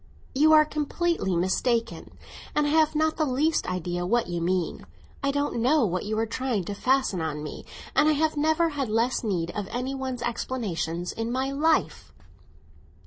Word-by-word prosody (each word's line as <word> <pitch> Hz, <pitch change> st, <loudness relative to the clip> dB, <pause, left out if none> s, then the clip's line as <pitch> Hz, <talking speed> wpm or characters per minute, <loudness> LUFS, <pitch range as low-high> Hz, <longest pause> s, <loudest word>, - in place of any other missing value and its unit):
"You 305 Hz, +4 st, +4 dB
are 305 Hz, 0 st, +7 dB
completely 305 Hz, -, -1 dB
mistaken, 230 Hz, +7 st, -1 dB, 0.4 s
and 300 Hz, -, +3 dB
I 290 Hz, -, 0 dB
have 310 Hz, 0 st, +3 dB
not 315 Hz, +1 st, +1 dB
the 310 Hz, -, +2 dB
least 295 Hz, +4 st, +1 dB
idea 175 Hz, -1 st, -2 dB
what 235 Hz, +6 st, +1 dB
you 175 Hz, -1 st, -3 dB
mean. 180 Hz, 0 st, -1 dB, 0.3 s
I 280 Hz, -, 0 dB
don't 285 Hz, -3 st, -1 dB
know 265 Hz, +2 st, +4 dB
what 185 Hz, -1 st, -2 dB
you 215 Hz, +1 st, -2 dB
are 225 Hz, -, +1 dB
trying 235 Hz, -3 st, -2 dB
to 200 Hz, -, -5 dB
fasten 250 Hz, -4 st, +1 dB
on 150 Hz, -2 st, -3 dB
me, 150 Hz, -, -7 dB, 0.3 s
and 300 Hz, +1 st, +5 dB
I -, -, +4 dB
have 310 Hz, +1 st, +1 dB
never 315 Hz, +3 st, +2 dB
had 280 Hz, -6 st, -3 dB
less 230 Hz, +4 st, +1 dB
need 175 Hz, -6 st, -1 dB
of 205 Hz, -2 st, -4 dB
any 250 Hz, +2 st, -3 dB
one's 260 Hz, -2 st, -4 dB
explanations 180 Hz, -8 st, -3 dB
in 225 Hz, +1 st, -3 dB
my 260 Hz, +2 st, -1 dB
life." 310 Hz, +3 st, 0 dB
250 Hz, 180 wpm, -26 LUFS, 190-295 Hz, 0.4 s, are